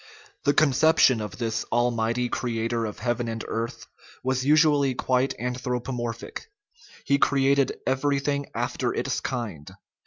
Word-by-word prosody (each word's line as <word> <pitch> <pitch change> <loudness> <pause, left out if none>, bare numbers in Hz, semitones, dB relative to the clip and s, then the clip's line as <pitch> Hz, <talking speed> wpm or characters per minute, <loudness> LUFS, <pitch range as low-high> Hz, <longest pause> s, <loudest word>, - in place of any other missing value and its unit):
The 145 -1 +3
conception 150 -4 +4
of 105 - -6
this 115 -2 -1
"almighty 120 0 0
creator 115 -1 -2
of 105 - -7
heaven 120 +1 -1
and 115 -1 -4
earth" 115 +1 -4 0.4
was 130 0 0
usually 145 -2 +4
quite 130 +1 +1
anthropomor 125 -1 -2
phic; 115 - -9 0.6
he 140 0 +2
created 140 0 +2
" - - -34
everything 140 +1 0
after - - -1
its - - -1
kind." 105 - -5
125 Hz, 130 wpm, -25 LUFS, 115-140 Hz, 0.6 s, conception